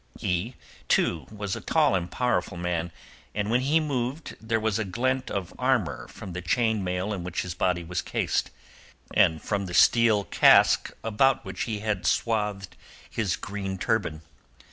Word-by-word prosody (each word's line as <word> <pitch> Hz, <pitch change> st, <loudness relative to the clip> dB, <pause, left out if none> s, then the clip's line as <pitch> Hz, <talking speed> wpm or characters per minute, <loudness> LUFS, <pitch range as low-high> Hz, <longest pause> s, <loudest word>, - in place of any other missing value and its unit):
He, 90 Hz, +8 st, -2 dB, 0.3 s
too, 80 Hz, -, +1 dB
was 105 Hz, -2 st, -4 dB
a -, -, -7 dB
tall -, -, +2 dB
and 90 Hz, -2 st, -1 dB
powerful 125 Hz, -7 st, -1 dB
man, 85 Hz, -1 st, -2 dB, 0.4 s
and 105 Hz, +1 st, -1 dB
when 125 Hz, +2 st, +3 dB
he 145 Hz, +5 st, +3 dB
moved 140 Hz, 0 st, -3 dB
there 110 Hz, 0 st, 0 dB
was 110 Hz, 0 st, 0 dB
a -, -, +1 dB
glint 130 Hz, +7 st, -1 dB
of 95 Hz, -4 st, -4 dB
armour 125 Hz, -7 st, 0 dB
from 90 Hz, -, -9 dB
the 90 Hz, -, -4 dB
chain 110 Hz, +3 st, +1 dB
mail 90 Hz, +3 st, -2 dB
in 95 Hz, -4 st, -4 dB
which 90 Hz, 0 st, -3 dB
his 90 Hz, -1 st, -5 dB
body 90 Hz, -1 st, 0 dB
was 90 Hz, +2 st, -3 dB
cased, -, -, -1 dB, 0.6 s
and 80 Hz, -1 st, +3 dB
from 100 Hz, -2 st, -2 dB
the 90 Hz, -, -4 dB
steel 115 Hz, -3 st, +5 dB
casque -, -, +5 dB
about 115 Hz, +4 st, +2 dB
which -, -, -4 dB
he 110 Hz, -3 st, -4 dB
had 105 Hz, -3 st, -1 dB
swathed 105 Hz, -4 st, -1 dB, 0.4 s
his 105 Hz, -6 st, 0 dB
green 95 Hz, -2 st, -5 dB
turban. 95 Hz, -8 st, -1 dB
105 Hz, 165 wpm, -26 LUFS, 90-115 Hz, 0.6 s, steel